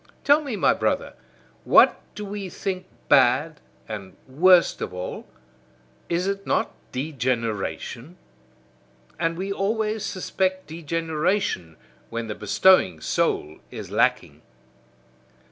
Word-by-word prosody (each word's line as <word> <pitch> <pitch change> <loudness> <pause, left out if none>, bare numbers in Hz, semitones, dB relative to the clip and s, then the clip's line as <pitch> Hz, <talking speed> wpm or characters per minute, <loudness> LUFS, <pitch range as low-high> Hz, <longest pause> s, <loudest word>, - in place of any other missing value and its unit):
Tell 290 +2 +5
me, 275 -7 -4
my - - +3
brother, - - -1 0.5
what - - +5
do 210 - -6
we 200 -1 -5
think 185 0 -4 0.2
bad, 140 +3 +3 0.3
and 100 -4 -8
worst 175 +7 +4
of 90 - -4
all? 90 0 -6 0.8
Is 175 +2 0
it 195 0 -3
not - - 0 0.2
DEGENERATION? 125 - -3 1.0
And 165 0 0
we 195 +2 -3
always 215 +1 -1
suspect 185 -1 -2
degeneration 160 - -2 0.3
when 115 0 -4
the 110 - -4
bestowing 105 - +3
soul 75 0 -1
is - - -8
lacking. - - +1
165 Hz, 110 wpm, -24 LUFS, 115-190 Hz, 1.0 s, Tell